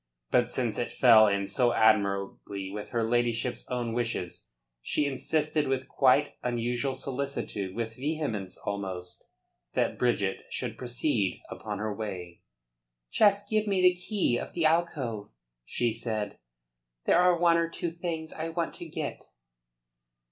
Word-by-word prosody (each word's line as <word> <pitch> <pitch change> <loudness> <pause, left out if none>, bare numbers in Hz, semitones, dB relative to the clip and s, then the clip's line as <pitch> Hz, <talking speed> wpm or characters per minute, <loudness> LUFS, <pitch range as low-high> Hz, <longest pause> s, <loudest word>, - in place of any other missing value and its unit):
But 120 -1 +3
since 120 -4 -2
it 120 - -2
fell 110 -4 +7
in 100 -1 +1
so 120 +4 +2
admirably 100 -2 +1
with 105 +1 -6
her 115 -1 0
ladyship's 120 +1 0
own 120 -2 -2
wishes, 115 -7 -3 0.3
she 150 - 0
insisted 150 +2 0
with 130 -1 -1
quite 140 +2 +3
unusual 120 +2 -1
solicitude, 130 -8 -3
with 115 -1 -3
vehemence 130 - -3
almost, 95 -3 -5 0.5
that - - +1
Bridget 100 -6 +1
should - - -3
proceed 120 -4 -1
upon - - -5
her 105 0 -2
way. 90 -5 -6 0.7
"Just 205 -1 +4
give 215 0 +1
me 195 -2 +2
the 180 0 +6
key 180 - 0
of - - -7
the 170 -2 +1
alcove," 150 -10 0 0.4
she 120 - 0
said. 110 -2 -3 0.7
"There - - +5
are 180 -1 +5
one 170 0 +5
or 170 0 +1
two 170 0 -3
things 165 -2 -4
I 160 +1 -4
want 165 0 -2
to - - -8
get." - - -4
120 Hz, 140 wpm, -29 LUFS, 105-155 Hz, 0.7 s, fell